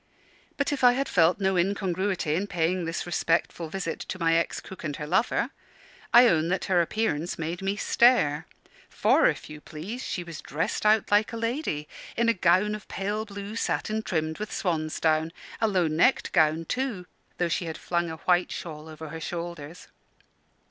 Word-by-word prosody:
But 285 0 0
if 275 - -4
I 245 0 +8
had 275 +2 -1
felt 170 +2 +3
no 190 -1 +1
incongruity 190 -2 0
in 190 +6 -1
paying 175 0 0
this 165 +1 -3
respectful 170 -1 0
visit 180 -2 -4
to - - -5
my 165 -2 +2
ex 165 0 +1
cook 190 - -11
and 150 -3 -3
her 150 - -5
lover, 185 +9 +1 0.6
I 240 +1 +8
own 160 -6 +3
that 185 +2 -1
her 180 -2 +3
appearance 170 -3 -1
made 165 +3 -4
me 195 +1 -1
stare. 205 - +3 0.4
For, - - +4
if - - -2
you 150 0 -10
please, 180 +13 -7
she 180 - -3
was 165 -3 -8
dressed 165 +7 -1
out 215 -1 +3
like 210 +3 +3
a - - -3
lady, 230 - -2 0.3
in 235 0 +3
a - - +5
gown 185 +2 +3
of 210 -1 -7
pale 210 +3 -3
blue 200 0 -7
satin 220 -1 -1
trimmed 160 -4 -2
with 215 +1 -4
swansdown 160 -2 0 0.3
a 225 - +4
low 185 -4 +2
necked 165 +12 +2
gown, 155 +1 +3
too, 250 -5 -2 0.3
though 175 - +1
she 170 +1 -1
had 160 -1 -5
flung 170 -1 -1
a 160 - -5
white 180 +2 +2
shawl 155 -2 -7
over 155 0 -8
her 160 +1 -7
shoulders. 170 -1 -6
175 Hz, 185 wpm, -27 LUFS, 160-210 Hz, 0.6 s, I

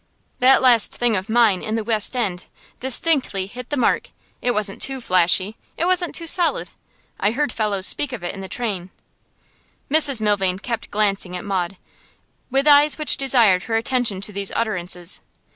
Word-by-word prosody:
That 265 +1 +4
last 240 -4 +4
thing 240 -2 0
of 190 +3 -4
mine 220 -5 +3
in 215 - -4
The 225 - -2
West 220 +2 -1
End 195 -8 -2 0.3
distinctly 260 - +2
hit 245 +5 -10
the 290 - -2
mark; 255 - 0 0.3
it 245 - -1
wasn't 210 -4 -2
too 270 -1 0
flashy, 185 0 +1 0.2
it 335 - -1
wasn't 360 -1 0
too 335 - -2
solid. 340 0 +1 0.5
I 200 - +2
heard 275 +4 -2
fellows 205 -4 0
speak 290 +5 +1
of 245 -7 -7
it 175 - -4
in 195 - -9
the 190 - -8
train.' 200 -7 -4 1.0
Mrs 290 -5 +4
Milvain 200 -4 0
kept 230 +3 -5
glancing 200 -3 0
at 180 - -9
Maud, 190 -2 -3 0.7
with 270 +2 0
eyes 290 0 +5
which 305 -1 +1
desired 230 -9 +3
her 225 - -2
attention 230 -4 -1
to 205 - -2
these 200 0 -2
utterances. 180 -5 -3
220 Hz, 175 wpm, -20 LUFS, 195-260 Hz, 1.0 s, eyes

